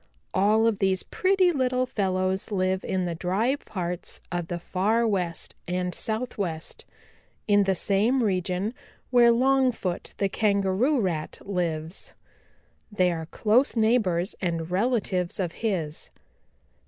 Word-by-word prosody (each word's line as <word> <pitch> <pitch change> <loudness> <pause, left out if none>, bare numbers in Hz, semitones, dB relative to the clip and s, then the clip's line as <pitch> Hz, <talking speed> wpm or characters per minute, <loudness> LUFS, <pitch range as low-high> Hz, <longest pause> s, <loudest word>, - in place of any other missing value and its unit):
All 210 +4 +3
of 225 -3 +1
these 190 -2 +2
pretty 375 -1 +2
little 255 -4 +1
fellows 190 -3 -1
live 185 -2 0
in 185 -1 -1
the 175 - -2
dry 190 - 0
parts 180 -9 -5
of 175 -2 -2
the 175 - -3
Far 210 +7 +1
West 180 -5 -2
and 180 0 -1
Southwest 205 -8 -4 0.6
in 205 -1 +4
the 190 0 +2
same 215 +8 +2
region 185 +1 -1 0.4
where 240 -1 +6
Longfoot 250 -7 +1
the 200 - +1
Kangaroo 200 +7 +1
Rat 170 -7 -2
lives. 170 -3 -3 0.8
They 185 -3 +2
are 160 -2 -4
close 230 - +2
neighbors 220 -5 +2
and 165 -2 -2
relatives 195 -4 0
of 180 -3 -1
his. 170 -9 -2
195 Hz, 125 wpm, -26 LUFS, 180-230 Hz, 0.8 s, where